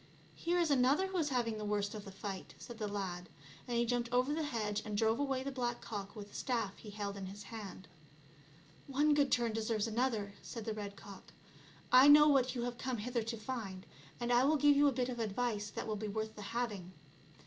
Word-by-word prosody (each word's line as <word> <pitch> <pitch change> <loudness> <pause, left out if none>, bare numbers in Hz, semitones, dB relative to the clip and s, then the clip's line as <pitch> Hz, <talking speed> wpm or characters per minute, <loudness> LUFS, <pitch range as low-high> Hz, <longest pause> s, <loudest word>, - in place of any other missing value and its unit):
" - - -26
Here 345 +1 0
is 335 -3 +2
another 275 +7 +4
who 380 -1 -3
is 305 -2 +1
having 235 -4 0
the - - -4
worst 205 -1 0
€^f 210 -2 -6
the 195 - -9
fight," 195 -1 -6
said 240 -1 -10
the 210 - -1
lad, 185 -3 -4 0.4
and 240 -1 -1
he 235 - +3
jumped 240 0 -1
over 250 +4 +2
the 320 - -1
hedge, 215 -8 -1
and 210 -1 -3
drove 225 +3 +2
away 270 -2 0
the 275 - -3
black 240 -2 -2
cock 205 -2 -6
with 205 -1 -8
the - - -19
staff 230 -6 -1
he 215 - -10
held 205 -1 -4
in 195 -1 -5
his 200 +2 -8
hand. 200 -5 -8 0.5
" 150 +2 -26
One 300 +1 +5
good 285 -2 +3
turn 235 -2 +2
deserves 220 -1 0
another," 225 -3 -1
said 230 -3 -7
the 220 - -2
red 205 -1 -6
cock. 200 -1 -12 0.3
" - - -24
I 275 - +8
know 300 +1 +9
what 265 -3 +3
you 240 - -1
have 245 0 -4
come 255 -2 -2
hither 235 +2 -1
to 230 +1 -4
find, 215 -5 -5 0.3
and 240 0 0
I 240 +1 +5
will 300 +3 +4
give 290 0 +5
you 290 +1 +5
a - - +4
bit 250 -1 -1
of 240 -1 -4
advice 215 -1 -1
that - - -5
will 215 -1 -2
be 215 +1 -4
worth 220 +1 -3
the 210 - -8
having. 210 -5 -3
230 Hz, 240 wpm, -35 LUFS, 205-255 Hz, 0.5 s, know